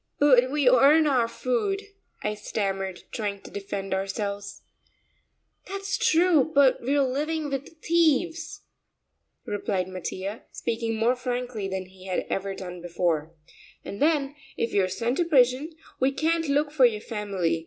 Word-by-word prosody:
"But 260 Hz, -3 st, +5 dB
we 290 Hz, -1 st, +1 dB
earn 280 Hz, +5 st, +6 dB
our 255 Hz, -6 st, +3 dB
food," 255 Hz, -, -1 dB, 0.4 s
I 210 Hz, -, 0 dB
stammered, 195 Hz, -3 st, -3 dB
trying 205 Hz, -3 st, -3 dB
to -, -, -12 dB
defend 195 Hz, -1 st, -4 dB
ourselves. 200 Hz, +1 st, -3 dB, 1.0 s
"That's 395 Hz, +1 st, -3 dB
true, 320 Hz, -3 st, +3 dB
but 275 Hz, -2 st, +5 dB
we're 275 Hz, +3 st, +2 dB
living 295 Hz, +3 st, -1 dB
with 280 Hz, +4 st, -6 dB
thieves," 330 Hz, 0 st, +1 dB, 0.8 s
replied 195 Hz, -3 st, -2 dB
Mattia, 185 Hz, +3 st, -5 dB
speaking 225 Hz, -1 st, -2 dB
more 230 Hz, +3 st, +2 dB
frankly 245 Hz, -4 st, -3 dB
than 190 Hz, -1 st, -4 dB
he 185 Hz, 0 st, -15 dB
had 185 Hz, -, -1 dB
ever 195 Hz, 0 st, -2 dB
done 180 Hz, -2 st, -7 dB
before, 170 Hz, -2 st, -1 dB, 0.5 s
"and 200 Hz, -, -7 dB
then 290 Hz, -2 st, +2 dB, 0.2 s
if 230 Hz, -, -1 dB
we're 195 Hz, -2 st, +3 dB
sent 235 Hz, +7 st, -1 dB
to 350 Hz, -, +2 dB
prison, 270 Hz, 0 st, +3 dB, 0.3 s
we 265 Hz, +1 st, +3 dB
can't 325 Hz, +2 st, 0 dB
look 290 Hz, +1 st, +1 dB
for 285 Hz, -4 st, +5 dB
your 215 Hz, -3 st, -3 dB
family. 195 Hz, -7 st, -1 dB
245 Hz, 145 wpm, -26 LUFS, 195-290 Hz, 1.0 s, earn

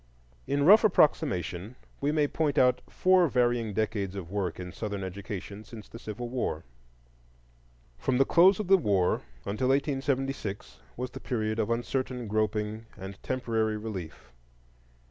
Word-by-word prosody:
In 140 Hz, 0 st, +1 dB
rough 210 Hz, +6 st, +8 dB
approximation 105 Hz, -, +2 dB, 0.2 s
we 145 Hz, +1 st, +1 dB
may 150 Hz, -1 st, +2 dB
point 150 Hz, -1 st, -1 dB
out 125 Hz, -2 st, +4 dB
four 185 Hz, -1 st, +4 dB
varying 120 Hz, -4 st, +1 dB
decades 100 Hz, -2 st, -2 dB
of 90 Hz, -3 st, -7 dB
work 95 Hz, -4 st, -2 dB
in 90 Hz, -1 st, -6 dB
Southern 100 Hz, 0 st, -4 dB
education 100 Hz, +2 st, -6 dB
since 110 Hz, -1 st, -11 dB
the 115 Hz, -, -11 dB
Civil 115 Hz, +3 st, -6 dB
War. 120 Hz, -10 st, -2 dB, 1.4 s
From 125 Hz, -, +1 dB
the 135 Hz, -, +5 dB
close 185 Hz, +7 st, +5 dB
of 210 Hz, -, -1 dB
the 190 Hz, +1 st, +5 dB
war 100 Hz, -, +2 dB, 0.3 s
until 110 Hz, +6 st, -1 dB
1876, 135 Hz, -5 st, -1 dB, 0.2 s
was 125 Hz, +1 st, -4 dB
the -, -, -8 dB
period 110 Hz, -2 st, -2 dB
of 110 Hz, -, 0 dB
uncertain 125 Hz, +1 st, -2 dB
groping 110 Hz, +1 st, -1 dB
and 95 Hz, 0 st, -9 dB
temporary 115 Hz, -4 st, -1 dB
relief. 90 Hz, -, -7 dB
115 Hz, 145 wpm, -28 LUFS, 100-135 Hz, 1.4 s, rough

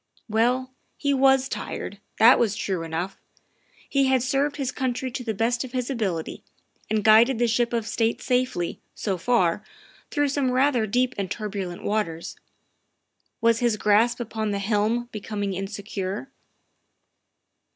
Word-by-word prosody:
Well, 245 Hz, +4 st, +1 dB, 0.3 s
he 285 Hz, -1 st, +1 dB
was 270 Hz, 0 st, +4 dB
tired, 200 Hz, -6 st, -5 dB, 0.2 s
that 235 Hz, +3 st, +7 dB
was 215 Hz, -4 st, +2 dB
true 190 Hz, -4 st, -2 dB
enough. 165 Hz, +4 st, -4 dB, 0.7 s
He 275 Hz, -1 st, +2 dB
had 260 Hz, -2 st, +3 dB
served 275 Hz, +3 st, 0 dB
his 270 Hz, -3 st, -2 dB
country 260 Hz, -1 st, -2 dB
to 250 Hz, -, -5 dB
the 220 Hz, -3 st, -3 dB
best 235 Hz, +4 st, +1 dB
of 260 Hz, -1 st, -9 dB
his 255 Hz, +1 st, -2 dB
ability, 195 Hz, -10 st, -3 dB, 0.5 s
and 215 Hz, -1 st, +1 dB
guided 225 Hz, +4 st, +6 dB
the 240 Hz, +1 st, +2 dB
ship 235 Hz, +1 st, +1 dB
of 230 Hz, -2 st, -1 dB
state 225 Hz, +1 st, 0 dB
safely, 250 Hz, -9 st, -1 dB
so 190 Hz, -4 st, -2 dB
far, 200 Hz, -3 st, +2 dB, 0.5 s
through 290 Hz, -1 st, +1 dB
some 275 Hz, -2 st, 0 dB
rather 255 Hz, -3 st, +2 dB
deep 250 Hz, +4 st, +1 dB
and 195 Hz, -2 st, -2 dB
turbulent 195 Hz, -5 st, -4 dB
waters. 175 Hz, -6 st, -2 dB, 1.1 s
Was 230 Hz, 0 st, +3 dB
his 235 Hz, -3 st, +1 dB
grasp 215 Hz, +4 st, +3 dB
upon 220 Hz, -2 st, -3 dB
the 200 Hz, -, -1 dB
helm 215 Hz, +4 st, 0 dB
becoming 205 Hz, -2 st, -3 dB
insecure? 195 Hz, +4 st, -5 dB
225 Hz, 145 wpm, -25 LUFS, 205-255 Hz, 1.1 s, that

